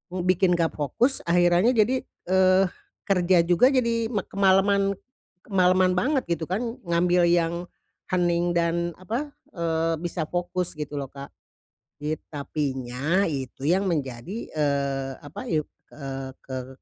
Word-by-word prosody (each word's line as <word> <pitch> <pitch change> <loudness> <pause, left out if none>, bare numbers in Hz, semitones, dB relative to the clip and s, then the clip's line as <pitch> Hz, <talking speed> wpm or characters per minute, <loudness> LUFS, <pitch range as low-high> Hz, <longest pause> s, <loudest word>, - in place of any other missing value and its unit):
mmm, 180 - -2
bikin 185 -1 +3
nggak 165 -1 0
fokus. 195 - 0
Akhirannya 175 +7 +4
jadi, 235 +4 +2 0.3
eh, 190 0 +5 0.4
kerja 180 -2 +4
juga 175 +8 +4
jadi, 235 -3 +1
mak 205 -5 -2
kemalaman, 195 0 +3 0.5
kemalaman 185 -1 +3
banget, 265 +8 +1 0.2
gitu - - -4
kan. 185 +4 -1 0.3
Ngambil 175 +1 +3
yang 170 -1 +2 0.6
hening 175 -1 +2
dan, 170 0 +1
apa, 240 +11 -3 0.2
eee, 165 -1 0
bisa 170 -2 -3
fokus, 175 0 -3
gitu 150 -1 -5
loh, 140 - -4
Kak. 140 0 -9 0.7
Yet 150 +1 -3
tapi 145 -2 -3
nya, 140 +10 0
itu 135 -3 -4
yang 190 +4 +2
menjadi, 135 - -3 0.2
eee, 140 -2 0
apa, 145 - -9
yuk 155 -2 0 0.2
eee, 135 -2 -7
175 Hz, 130 wpm, -25 LUFS, 150-190 Hz, 0.7 s, eh